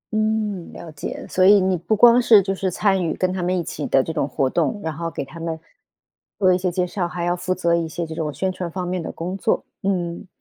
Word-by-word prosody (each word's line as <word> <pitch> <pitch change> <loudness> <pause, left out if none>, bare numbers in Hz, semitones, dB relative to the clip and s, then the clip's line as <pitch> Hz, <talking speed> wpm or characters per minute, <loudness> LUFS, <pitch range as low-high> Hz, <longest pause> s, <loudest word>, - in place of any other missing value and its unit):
嗯， 215 -4 -1
了 165 - -10
解， 150 - -6
所 185 - +1
以 200 +2 +7
你 185 0 +1
不 180 +6 0
光 240 +3 +7
是 230 -3 +7
就 195 +1 -1
是 190 0 -1
参 190 +1 +1
与 165 - -1
跟 185 0 0
他 185 - -3
们 180 +1 0
一 175 - -1
起 165 -3 -5
的 135 - +3
这 160 - -4
种 150 -3 0
活 135 +1 0
动， 175 - 0
然 160 - -2
后 165 +2 -4
给 150 - -5
他 165 +5 -11
们 165 -1 -4 0.8
做 185 -2 +4
一 - - +3
些 180 0 -1
介 180 +1 0
绍， 180 0 -2
还 175 0 -5
要 175 0 +1
负 180 +1 -2
责 170 -2 +1
一 170 -1 +1
些 170 +2 -4
这 160 - -7
种 160 -2 -3
宣 190 +5 -2
传 180 -1 -5
方 180 +1 -4
面 180 0 -2
的 - - -5
工 180 +3 -5
作， 195 - 0 0.2
嗯。 180 -2 -2
180 Hz, 285 characters per minute, -22 LUFS, 170-190 Hz, 0.8 s, 以